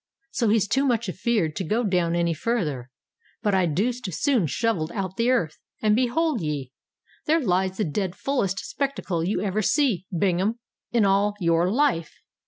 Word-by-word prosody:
So 235 Hz, -7 st, +1 dB
he's 210 Hz, -1 st, +3 dB
too 270 Hz, +6 st, +2 dB
much 235 Hz, -3 st, +1 dB
afeared 185 Hz, -4 st, 0 dB
to 195 Hz, -, -1 dB
go 220 Hz, +8 st, 0 dB
down 180 Hz, -5 st, +1 dB
any 170 Hz, -1 st, +1 dB
farther; 155 Hz, -, -2 dB, 0.5 s
but 205 Hz, -, +2 dB
I 185 Hz, -2 st, +3 dB
deuced 210 Hz, -, -1 dB
soon 235 Hz, -, +1 dB
shovelled 170 Hz, -, -1 dB
out 190 Hz, -2 st, -3 dB
the 230 Hz, +4 st, +1 dB
earth—and, 210 Hz, 0 st, 0 dB
behold 260 Hz, -, +1 dB
ye! 145 Hz, -5 st, -3 dB, 0.6 s
there 320 Hz, +2 st, +4 dB
lies 190 Hz, -, 0 dB
the 215 Hz, -, 0 dB
dread 180 Hz, +3 st, -2 dB
fullest 200 Hz, -9 st, -1 dB
spectacle 265 Hz, -, -2 dB
you 185 Hz, +1 st, 0 dB
ever 205 Hz, +1 st, 0 dB
see, 215 Hz, -, +1 dB
Bingham, 190 Hz, +5 st, +1 dB, 0.3 s
in 235 Hz, -3 st, +3 dB
all 200 Hz, +1 st, +2 dB
your 170 Hz, 0 st, +2 dB
life. 230 Hz, -, +1 dB
195 Hz, 165 wpm, -25 LUFS, 175-235 Hz, 0.6 s, there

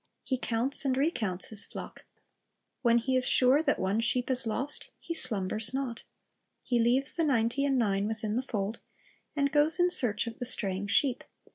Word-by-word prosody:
He 260 Hz, -2 st, -2 dB
counts 245 Hz, +5 st, 0 dB
and 260 Hz, -2 st, -1 dB
recounts 220 Hz, -, -1 dB
the -, -, -8 dB
flock. -, -, -4 dB, 0.8 s
When 235 Hz, -2 st, +3 dB
he 260 Hz, +3 st, -1 dB
is 255 Hz, -1 st, +2 dB
sure 260 Hz, +4 st, +4 dB
that 290 Hz, -3 st, 0 dB
one 195 Hz, +3 st, -1 dB
sheep 245 Hz, +3 st, -1 dB
is 250 Hz, -2 st, -2 dB
lost, 270 Hz, +6 st, -4 dB
he 335 Hz, -, -6 dB
slumbers 220 Hz, -, +1 dB
not. 260 Hz, -4 st, -4 dB, 0.6 s
He 245 Hz, -2 st, 0 dB
leaves 250 Hz, +4 st, +4 dB
the 335 Hz, -, 0 dB
ninety 255 Hz, -2 st, 0 dB
and 275 Hz, -2 st, +1 dB
nine 200 Hz, -3 st, 0 dB
within 220 Hz, -1 st, -4 dB
the 250 Hz, -, 0 dB
fold, 215 Hz, -3 st, -4 dB, 0.6 s
and 280 Hz, -1 st, 0 dB
goes 300 Hz, +4 st, +3 dB
in 355 Hz, 0 st, +4 dB
search 230 Hz, -, +3 dB
of 230 Hz, 0 st, -8 dB
the 245 Hz, -, -3 dB
straying 200 Hz, -5 st, 0 dB
sheep. 255 Hz, +4 st, +2 dB
245 Hz, 180 wpm, -28 LUFS, 220-275 Hz, 0.8 s, sure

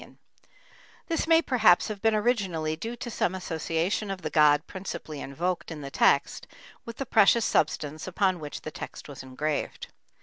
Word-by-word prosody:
This 330 Hz, -1 st, -1 dB
may 330 Hz, 0 st, +5 dB
perhaps 220 Hz, -11 st, +4 dB
have 210 Hz, -2 st, -6 dB
been 225 Hz, -1 st, +3 dB
originally 195 Hz, -9 st, 0 dB
due 225 Hz, +9 st, -5 dB
to 240 Hz, 0 st, -6 dB
some 190 Hz, -3 st, 0 dB
association 170 Hz, +3 st, -2 dB
of 195 Hz, -2 st, -5 dB
the -, -, -3 dB
god 150 Hz, 0 st, +4 dB
principally 170 Hz, -6 st, -7 dB
invoked 170 Hz, +7 st, -3 dB
in 160 Hz, -3 st, -7 dB
the 140 Hz, -1 st, -7 dB
text -, -, +2 dB, 0.4 s
with 230 Hz, -1 st, -8 dB
the 275 Hz, -, -3 dB
precious 225 Hz, 0 st, +4 dB
substance 150 Hz, +1 st, 0 dB
upon 185 Hz, -1 st, +1 dB
which 150 Hz, -2 st, -7 dB
the 155 Hz, -, -7 dB
text -, -, -8 dB
was 145 Hz, -2 st, -9 dB
engraved. 140 Hz, +3 st, -4 dB
180 Hz, 165 wpm, -27 LUFS, 155-215 Hz, 0.4 s, may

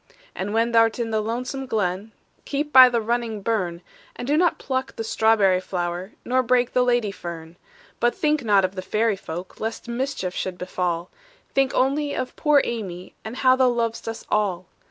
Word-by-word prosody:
"And 195 Hz, +2 st, -4 dB
when 230 Hz, +2 st, +1 dB
thou 230 Hz, -1 st, +6 dB
'rt 225 Hz, -, -3 dB
in 230 Hz, -1 st, -2 dB
the 220 Hz, -1 st, +1 dB
lonesome 250 Hz, +5 st, -4 dB
glen, 205 Hz, -2 st, -1 dB, 0.3 s
Keep 295 Hz, +1 st, -3 dB
by 255 Hz, -1 st, +10 dB
the 240 Hz, -1 st, +1 dB
running 225 Hz, -2 st, -2 dB
burn, 180 Hz, -6 st, -1 dB, 0.3 s
And 245 Hz, -, -6 dB
do 290 Hz, -, +2 dB
not 345 Hz, +2 st, +3 dB
pluck 260 Hz, 0 st, -3 dB
the 225 Hz, -, -4 dB
strawberry 220 Hz, -4 st, +3 dB
flower, 180 Hz, +1 st, -4 dB
Nor 255 Hz, +1 st, +2 dB
break 250 Hz, 0 st, +1 dB
the 250 Hz, -, +3 dB
lady 240 Hz, -4 st, +2 dB
fern. 170 Hz, -3 st, -8 dB, 0.4 s
"But 240 Hz, 0 st, +2 dB
think 300 Hz, -2 st, +1 dB
not 200 Hz, -4 st, +4 dB
of 185 Hz, -, -4 dB
the 185 Hz, -, -5 dB
fairy 215 Hz, +3 st, +1 dB
folk, 175 Hz, 0 st, -8 dB
Lest 225 Hz, +2 st, -4 dB
mischief 235 Hz, -6 st, -3 dB
should 185 Hz, -1 st, -4 dB
befall; 180 Hz, -1 st, -3 dB, 0.4 s
Think 270 Hz, -1 st, +2 dB
only 285 Hz, +3 st, +1 dB
of 255 Hz, -, -4 dB
poor 300 Hz, -2 st, +4 dB
Amy, 185 Hz, -6 st, -5 dB
And 220 Hz, +2 st, -6 dB
how 255 Hz, 0 st, +4 dB
thou 260 Hz, -1 st, +4 dB
lov'st 230 Hz, -2 st, -2 dB
us 225 Hz, 0 st, -5 dB
all. 195 Hz, -4 st, 0 dB
225 Hz, 190 wpm, -23 LUFS, 185-255 Hz, 0.4 s, by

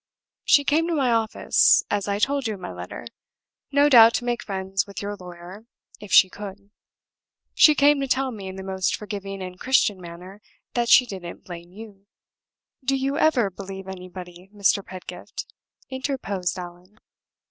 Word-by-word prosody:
She 285 Hz, -, +5 dB
came 315 Hz, +4 st, +1 dB
to 340 Hz, -, -1 dB
my 265 Hz, -5 st, +1 dB
office 225 Hz, -1 st, +3 dB
(as 205 Hz, -1 st, -1 dB
I 200 Hz, 0 st, 0 dB
told 275 Hz, +4 st, 0 dB
you 215 Hz, -, -3 dB
in -, -, -13 dB
my -, -, -6 dB
letter), 90 Hz, 0 st, -8 dB, 0.7 s
no 285 Hz, +1 st, +4 dB
doubt 235 Hz, -4 st, +8 dB
to 240 Hz, -, -2 dB
make 240 Hz, -1 st, -1 dB
friends 195 Hz, -1 st, -3 dB
with 200 Hz, -, -8 dB
your 205 Hz, 0 st, -4 dB
lawyer, 180 Hz, +3 st, -12 dB, 0.3 s
if 205 Hz, -3 st, -11 dB
she 185 Hz, -, +8 dB
could; 200 Hz, +1 st, -10 dB, 0.8 s
she 305 Hz, -, +6 dB
came 285 Hz, 0 st, +4 dB
to 275 Hz, -, -2 dB
tell 265 Hz, 0 st, 0 dB
me, 200 Hz, -5 st, -8 dB
in 190 Hz, -, -7 dB
the 190 Hz, -, -7 dB
most 190 Hz, -1 st, -1 dB
forgiving 195 Hz, -2 st, -6 dB
and 180 Hz, 0 st, -9 dB
Christian 215 Hz, -7 st, +2 dB
manner, 180 Hz, +4 st, -11 dB, 0.3 s
that 240 Hz, -1 st, 0 dB
she 250 Hz, -, +7 dB
didn't 185 Hz, -6 st, -8 dB
blame 175 Hz, -1 st, -10 dB
you." 200 Hz, -1 st, -13 dB, 0.8 s
"Do 270 Hz, +1 st, +1 dB
you 275 Hz, +3 st, -1 dB
ever 245 Hz, -10 st, +2 dB
believe 195 Hz, 0 st, -8 dB
in 190 Hz, -, -6 dB
anybody, 180 Hz, 0 st, -11 dB
Mr. 200 Hz, -1 st, +1 dB
Pedgift?" 185 Hz, -1 st, -8 dB, 0.5 s
interposed 255 Hz, -, -3 dB
Allan. 180 Hz, +3 st, -10 dB
200 Hz, 170 wpm, -24 LUFS, 185-245 Hz, 0.8 s, doubt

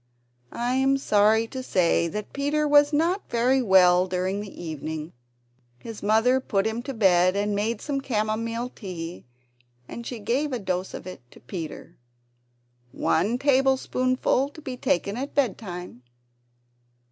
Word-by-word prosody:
I 240 Hz, +1 st, -1 dB
am 270 Hz, +1 st, +3 dB
sorry 215 Hz, -2 st, +3 dB
to 260 Hz, -, -5 dB
say 180 Hz, -7 st, +2 dB
that 210 Hz, +4 st, -6 dB
Peter 295 Hz, +2 st, 0 dB
was 290 Hz, 0 st, +5 dB
not 335 Hz, +6 st, 0 dB
very 250 Hz, +3 st, +2 dB
well 185 Hz, -4 st, +5 dB
during 185 Hz, +2 st, -1 dB
the 205 Hz, -, -7 dB
evening. 155 Hz, 0 st, -5 dB, 0.6 s
His 225 Hz, -, -9 dB
mother 225 Hz, +5 st, +3 dB
put 200 Hz, -6 st, -1 dB
him 220 Hz, +2 st, -2 dB
to 270 Hz, +2 st, -6 dB
bed, 185 Hz, -3 st, +4 dB
and 205 Hz, +1 st, 0 dB
made 210 Hz, +2 st, -1 dB
some 280 Hz, -2 st, -2 dB
camomile 230 Hz, 0 st, -2 dB
tea; 175 Hz, -7 st, -8 dB, 0.6 s
and 235 Hz, -, -7 dB
she 245 Hz, -, -5 dB
gave 255 Hz, +7 st, -1 dB
a -, -, 0 dB
dose 185 Hz, -3 st, -3 dB
of -, -, -8 dB
it 185 Hz, -7 st, -9 dB
to -, -, -17 dB
Peter! 160 Hz, +4 st, -8 dB, 0.9 s
"One 200 Hz, +9 st, +1 dB
table 270 Hz, 0 st, +3 dB
spoonful 255 Hz, +1 st, 0 dB
to 300 Hz, -, -13 dB
be 260 Hz, -3 st, -5 dB
taken 200 Hz, -2 st, -1 dB
at 275 Hz, +3 st, -5 dB
bed 260 Hz, -8 st, +2 dB
time." 180 Hz, -, -8 dB
220 Hz, 150 wpm, -25 LUFS, 185-260 Hz, 0.9 s, was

